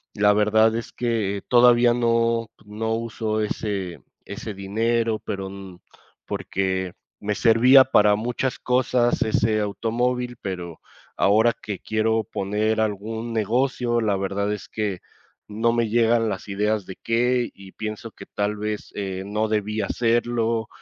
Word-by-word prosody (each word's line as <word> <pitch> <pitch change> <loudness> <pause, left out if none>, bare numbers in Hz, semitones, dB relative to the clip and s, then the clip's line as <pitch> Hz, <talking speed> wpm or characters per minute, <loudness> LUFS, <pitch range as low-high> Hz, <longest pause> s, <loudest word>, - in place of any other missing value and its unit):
la 105 0 +4
verdad 110 +2 +3
es 115 - -6
que 110 -5 -1
todavía 120 -1 +6
no 115 -1 +1 0.2
no 110 +2 -3
uso 110 -1 -2
ese 100 -4 -3 0.3
ese 110 - -6
dinero, 115 +3 0
pero, 95 -1 -5 0.8
porque 95 -1 -2 0.3
me 105 0 -1
servía 125 +4 +6
para 105 -5 +4
muchas 125 +3 -2
cosas 125 -1 +1
ese 110 0 +1
automóvil. 120 +4 -1
Pero 90 -4 -6 0.4
ahora 110 +4 +4
que 105 -3 -5
quiero 110 0 0
poner 110 +1 -1
algún 110 +2 -3
negocio, 120 +2 0
la 105 -3 +1
verdad 100 +1 -1
es 105 - -7
que 105 -4 -2 0.5
no 110 +3 +1
me 115 -1 +1
llegan 115 0 +3
las - - -5
ideas 105 0 0
de 95 - -9
qué, 120 +1 +1
y 95 -1 -14
pienso 110 +1 -6
que - - -12
tal 105 +1 -2
vez, 105 0 -4
eh, 95 -2 -4
no 105 +2 -1
debí 105 0 -1
hacerlo, 115 0 0
110 Hz, 135 wpm, -23 LUFS, 105-115 Hz, 0.8 s, todavía